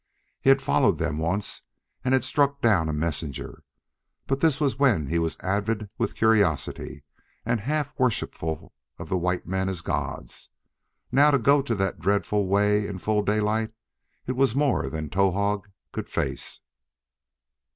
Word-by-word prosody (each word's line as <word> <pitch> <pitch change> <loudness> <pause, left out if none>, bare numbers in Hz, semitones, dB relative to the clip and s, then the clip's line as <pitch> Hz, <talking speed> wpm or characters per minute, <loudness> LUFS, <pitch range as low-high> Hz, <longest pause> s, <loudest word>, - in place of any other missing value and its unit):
He - - +2
had 135 - +5
followed - - +3
them 80 -2 -2
once 90 +6 -1 0.4
and 130 +1 +3
had 130 - +1
struck 140 +1 +1
down 100 - +3
a - - 0
messenger, 75 -2 -4 0.6
but 135 0 -1
this 160 -3 +3
was 140 -3 0
when 120 - +3
he 85 +5 0
was 80 -1 -1
avid 105 +2 -1
with 115 -3 -1
curiosity 100 -9 +1 0.4
and 115 0 +1
half 145 +4 -1
worshipful 80 - -1 0.2
of - - -8
the 95 - +1
white 90 +1 -1
men 95 +1 -1
as 90 -3 -4
gods. - - -4 0.6
Now, 145 +2 +6
to 140 - +4
go 140 +4 +4
that 100 - -1
dreadful 100 +2 +1
way 105 +1 +2
in 100 - -5
full 105 +3 +1
daylight! 110 +2 0 0.5
it 130 - -2
was 130 -2 +2
more 140 -2 +1
than 80 -1 -4
Towahg 100 +3 +1 0.3
could - - -5
face. - - -3
105 Hz, 150 wpm, -26 LUFS, 90-130 Hz, 0.6 s, Now